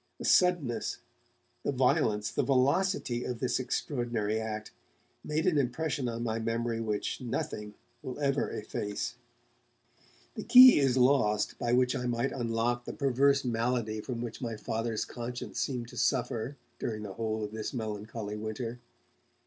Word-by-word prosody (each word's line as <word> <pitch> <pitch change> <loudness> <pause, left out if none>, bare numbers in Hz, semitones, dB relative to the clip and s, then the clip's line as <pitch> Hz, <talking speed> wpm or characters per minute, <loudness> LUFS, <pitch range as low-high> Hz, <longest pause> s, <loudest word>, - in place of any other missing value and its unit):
The - - -6
suddenness, 175 -10 +2 0.6
the - - -1
violence, 125 -6 +2
the - - +1
velocity 135 0 +1
of 125 - -3
this 130 +2 0
extraordinary 120 -4 -1
act 110 -1 -5 0.5
made 155 +1 -1
an 160 -5 +3
impression 135 0 -1
on 115 0 -4
my 115 -1 -1
memory 115 0 -1
which 105 +1 -2
nothing 105 -3 -4 0.3
will 130 - -6
ever 140 -1 +1
efface. 105 +1 -4 1.2
The - - -5
key 255 -6 +9
is 135 -2 +2
lost 110 -5 +3
by 120 - 0
which 125 0 +3
I 125 - -2
might 120 +3 0
unlock 120 0 -1
the - - -5
perverse 140 0 +2
malady 115 -2 0
from 120 +1 -4
which 120 - -6
my 115 -3 -3
Father's 110 0 -2
conscience 120 0 -6
seemed 125 -4 -2
to - - -11
suffer 125 0 0 0.2
during 110 -2 -3
the 100 -2 -6
whole 110 +1 -2
of 105 - -4
this 110 -1 -4
melancholy 110 -2 -4
winter. 110 +3 -4
120 Hz, 150 wpm, -30 LUFS, 110-130 Hz, 1.2 s, key